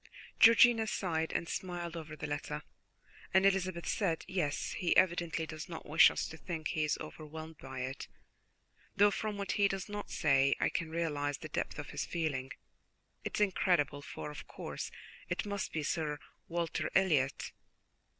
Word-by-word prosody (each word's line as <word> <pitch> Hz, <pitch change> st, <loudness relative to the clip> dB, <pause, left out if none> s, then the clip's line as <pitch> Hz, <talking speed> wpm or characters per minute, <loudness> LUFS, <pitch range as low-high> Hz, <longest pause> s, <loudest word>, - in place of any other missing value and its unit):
Georgiana 230 Hz, 0 st, +7 dB
sighed 160 Hz, -6 st, -1 dB
and 165 Hz, -, -1 dB
smiled 175 Hz, -2 st, -4 dB
over 160 Hz, -2 st, -6 dB
the 150 Hz, -, -5 dB
letter, 150 Hz, 0 st, -4 dB, 0.7 s
and 190 Hz, +1 st, +6 dB
Elizabeth 185 Hz, -3 st, +1 dB
said: 170 Hz, -6 st, 0 dB
"Yes, 175 Hz, -6 st, -1 dB
he 180 Hz, -4 st, +1 dB
evidently 175 Hz, -3 st, +3 dB
does 155 Hz, +1 st, -7 dB
not 165 Hz, -, -7 dB
wish 155 Hz, +2 st, +8 dB
us -, -, -2 dB
to 160 Hz, -, -9 dB
think 160 Hz, -2 st, -4 dB
he 155 Hz, -, 0 dB
is 150 Hz, -, +1 dB
overwhelmed 155 Hz, 0 st, -8 dB
by 130 Hz, -1 st, -6 dB
it, 130 Hz, +2 st, -4 dB, 0.9 s
though 205 Hz, +1 st, +6 dB
from 210 Hz, +1 st, -3 dB
what 200 Hz, -1 st, -2 dB
he 200 Hz, -1 st, +4 dB
does 195 Hz, -1 st, -3 dB
not 205 Hz, 0 st, -5 dB
say 140 Hz, -2 st, +3 dB
I -, -, +2 dB
can 165 Hz, -2 st, -2 dB
realize 145 Hz, -4 st, -1 dB
the 155 Hz, -, -8 dB
depth -, -, -2 dB
of 145 Hz, -1 st, -6 dB
his -, -, -2 dB
feeling. 140 Hz, -6 st, -2 dB, 0.7 s
It -, -, -3 dB
is -, -, 0 dB
incredible; 175 Hz, -7 st, +2 dB
for, 150 Hz, -, -6 dB
of 150 Hz, -, -9 dB
course, -, -, -5 dB, 0.4 s
it -, -, -1 dB
must 200 Hz, -1 st, -3 dB
be 155 Hz, -, -2 dB
Sir 150 Hz, -1 st, -1 dB, 0.3 s
Walter 170 Hz, -1 st, -1 dB
Elliot." 150 Hz, -9 st, +2 dB
165 Hz, 170 wpm, -33 LUFS, 150-185 Hz, 0.9 s, wish